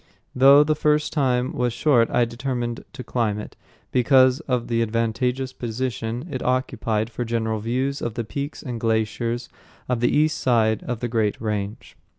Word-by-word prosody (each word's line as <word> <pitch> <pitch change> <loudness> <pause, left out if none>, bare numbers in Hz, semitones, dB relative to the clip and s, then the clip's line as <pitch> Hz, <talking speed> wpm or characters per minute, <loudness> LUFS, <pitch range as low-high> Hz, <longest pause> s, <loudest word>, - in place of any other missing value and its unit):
Though 140 +3 +7
the 155 +1 +1 0.4
time 130 -4 +1
was 125 -1 0
short 125 -3 +3
I 120 - +2
determined 120 0 -4
to 125 - -7
climb 115 -5 -1
it, 105 - -8 0.4
because 130 +1 +4
of 125 -3 0
the 115 -1 +1
advantageous 115 +3 -1
position 120 +2 -4
it 130 - -3
occupied 120 -3 -1
for 120 - -3
general 110 -1 -1
views 130 +5 -2
of 115 -2 -3
the 120 - -2
peaks 140 +8 -5
and 120 -4 -5
glaciers 115 +2 -1 0.4
of 125 -2 0
the 120 - +2
east 155 +1 +2
side 110 -3 +2
of 120 -2 -3
the 120 - -1
great 110 -3 0
range. 105 -1 -4
120 Hz, 160 wpm, -23 LUFS, 115-130 Hz, 0.4 s, Though